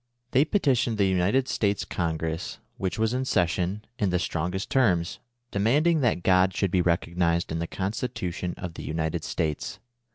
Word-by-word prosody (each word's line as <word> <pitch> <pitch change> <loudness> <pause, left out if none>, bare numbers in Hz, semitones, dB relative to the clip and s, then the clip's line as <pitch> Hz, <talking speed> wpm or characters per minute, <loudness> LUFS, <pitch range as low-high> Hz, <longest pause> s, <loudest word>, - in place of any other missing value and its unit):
They 135 +4 +4
petitioned 130 - +2
the 100 - +3
United 95 +8 +2
States 100 -2 0
Congress, 80 -1 -2 0.2
which 95 -1 -2
was 110 +1 +1
in 130 +1 0
session, 95 -1 0
in 100 - +2
the 90 - +2
strongest 90 +3 -2
terms, 90 -10 +2 0.3
demanding 145 +11 +3
that 115 -10 +1
God 95 0 +4
should 100 -3 0
be 90 - +3
recognized 85 -1 +1
in 80 - -1
the 85 - -2
Constitution 95 -3 -3
of 90 -2 -6
the - - -8
United 80 0 -2
States. 75 -2 -2
95 Hz, 160 wpm, -26 LUFS, 85-110 Hz, 0.3 s, They